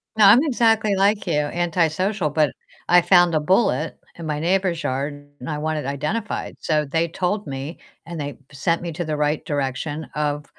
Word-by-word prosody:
No, 215 - +6
I'm 225 +9 +8
exactly 225 -7 +2
like 200 +1 +2
you, - - 0
antisocial, 170 +4 0
but 150 0 +2 0.4
I 175 0 +7
found 175 -2 +4
a - - +3
bullet 160 - +1 0.2
in 170 - -8
my 150 -1 -2
neighbor's 180 0 0
yard, 140 +3 -2 0.3
and 125 - -7
I 150 -1 -3
want 155 0 -1
it 150 - -4
identified, 150 +11 -3
so 150 -1 0
they 165 +4 0
told 190 +5 -2
me, 140 +3 -6 0.3
and 170 0 -7
they 145 -1 -5
sent 165 +5 0
me 170 - -4
to 175 +2 -4
the 155 -1 -2
right 150 +1 0
direction 145 +2 -3
of, 150 -1 -1
160 Hz, 185 wpm, -22 LUFS, 150-185 Hz, 0.4 s, I'm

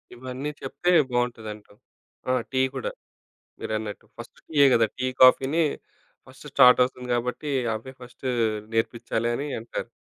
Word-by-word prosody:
ఇవన్నీ 130 +3 -5
చెప్తే 175 +6 -1 0.2
బావుంటదంటావు. 110 -4 -4 0.5
ఆ! - - +3 0.2
టీ 130 0 +1
కూడా 130 - -3 0.7
మీరన్నట్టు. 110 -1 -4
ఫస్ట్ 120 - -11
టీయే 145 -3 +4
గదా! 115 -1 +4
టీ, 130 - -1 0.2
కాఫీని 135 +5 +5 0.6
ఫస్ట్ 135 +3 -15
స్టార్టవుతుంది 125 -1 +5
గాబట్టీ, 125 +5 -2 0.2
అవే 130 +4 -7
ఫస్టూ 125 +1 -8 0.5
నేర్పిచ్చాలనీ 120 +3 -1
అంటారు. 115 - -6
125 Hz, 115 wpm, -25 LUFS, 115-130 Hz, 0.7 s, కాఫీని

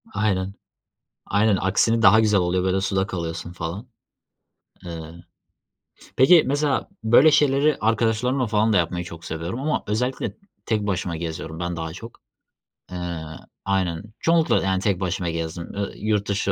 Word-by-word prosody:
Aynen, 95 -2 0 0.7
aynen, 105 +1 +3
aksine 115 +5 +2
daha 110 +1 +7
güzel 105 -2 +3
oluyor, 90 0 0
böyle, 95 +1 +1
suda 95 0 0
kalıyorsun 85 -1 -5
falan. 90 +8 -6 1.0
Iıı, 80 -2 -7 0.9
t - - -16
peki, 160 +5 +7
mesela, 145 0 0 0.2
böyle 120 +7 +6
şeyleri 145 0 +3
arkadaşlarımla 115 +3 +1
falan 110 +1 +2
da - - +3
yapmayı 90 0 0
çok 85 -1 -10
seviyorum 85 +9 -4
ama 150 +2 -1
özellikle 125 +5 -2 0.3
tek 105 -2 0
başıma 90 -3 -2
geziyorum 80 0 -6
ben 85 0 -3
daha 80 -1 -4
çok. 115 +7 -11 0.7
Eee, 90 -2 -4 0.4
aynen 95 -4 0 0.2
çoğunlukla, 165 - +2
yani, 95 -1 0
tek 100 -3 0
başıma 90 -1 -2
gezdim, 80 +1 -4
ııı, 100 +3 -5
yurt 105 -1 -1
dışı 100 0 0
100 Hz, 145 wpm, -23 LUFS, 85-115 Hz, 1.0 s, daha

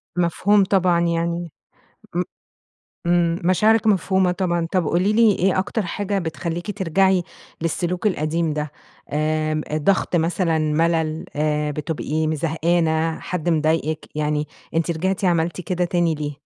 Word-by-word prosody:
مفهوم 180 +4 +3
طبعًا، 185 -3 +2
يعني 170 0 -1 0.6
م - - +1 0.9
إمم 170 -1 +2
مشاعرِك 215 +5 +3
مفهومة 190 -2 +3
طبعًا، 175 -2 -1
طب 185 -4 +1
قولي 185 +7 +2
لي، 225 -1 +5
إيه 185 +1 +2
أكتر 210 +3 -1
حاجة 200 +2 -2
بتخليكِ 175 +4 -4
ترجعي 190 0 +2 0.4
للسلوك 175 +4 -1
القديم 160 -3 0
ده؟ 150 -1 -3 0.4
امم، 155 0 0
ضغط 180 +3 +1
مثلًا، 165 0 +1
ملل، 160 +1 0
آآ، 150 0 0
بتبقي 155 +1 -2
م 160 - 0
زهقانة، 165 0 0
حد 175 -1 -3
مضايقِك، 155 0 0
يعني 150 0 -1 0.3
أنتِ 165 +1 +1
رجعتِ 190 +4 -1
عملتِ 170 0 +1
كده 180 +1 -1
تاني 170 -2 +1
ليه؟ 150 -1 -5
170 Hz, 130 wpm, -22 LUFS, 155-185 Hz, 0.9 s, لي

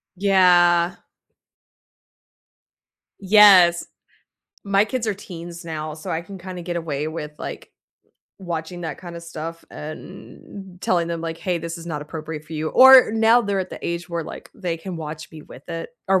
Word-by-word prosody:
Yeah. 180 -3 +4 2.2
Yes. 190 -4 +6 0.8
My 200 0 +3
kids 235 +2 -3
are 215 - 0
teens 170 -3 -9
now, 155 -2 -5
so 155 - -8
I 160 - -1
can 195 +3 -10
kinda 180 0 -8
get 175 0 -4
away 155 -3 -3
with, 150 -1 -6
like, - - -7 0.7
watching 175 -1 -5
that 165 -2 -6
kinda 170 -2 -8
stuff 165 0 -7
and 185 +4 -10
telling 175 -2 +1
them, 170 -1 -3
like, 165 0 -5
"Hey, 175 0 -1
this 165 +1 -6
is 165 - -10
not 150 -3 -4
appropriate 155 0 -7
for 155 - -13
you," 155 0 -2
or 260 -3 +8
now 225 +2 +5
they're 200 -3 -1
at 185 - -5
the - - -7
age 170 0 -4
where, 170 -2 -3
like, - - -10
they 180 -5 -3
can 175 +2 -7
watch 155 -1 -7
me 155 -2 -11
with 135 - -15
it 165 +4 -5 0.2
or 190 -1 +4
170 Hz, 165 wpm, -22 LUFS, 160-190 Hz, 2.2 s, or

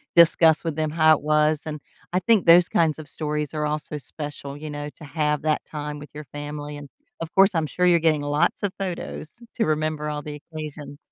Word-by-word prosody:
discuss 165 -1 +6
with 165 -3 -2
them 155 0 -1
how 155 0 +5
it - - -12
was, 150 0 +2
and, 155 -1 -5 0.3
I 180 - +3
think 210 +1 +3
those 170 +1 +7
kinds 160 -3 +2
of 155 -2 -10
stories 150 -1 -3
are 150 0 -1
also 150 0 -3
special, 145 -1 -7
you 150 +1 -7
know, 145 0 -5
to - - -14
have 150 0 -1
that 155 0 0
time 150 -1 -6
with 145 - -11
your 150 - -7
family, 145 +1 -7
and, 145 - -9 0.3
of 165 0 -6
course, 195 +1 +5
I'm 160 -1 +1
sure 180 +4 0
you're 175 -1 +5
getting 155 -2 +2
lots 145 +7 0
of 200 - 0
photos 185 +1 -5
to 225 - +1
remember 155 0 -1
all 150 0 -3
the 150 0 -7
occasions. 150 -2 -7
150 Hz, 215 wpm, -24 LUFS, 150-160 Hz, 0.3 s, those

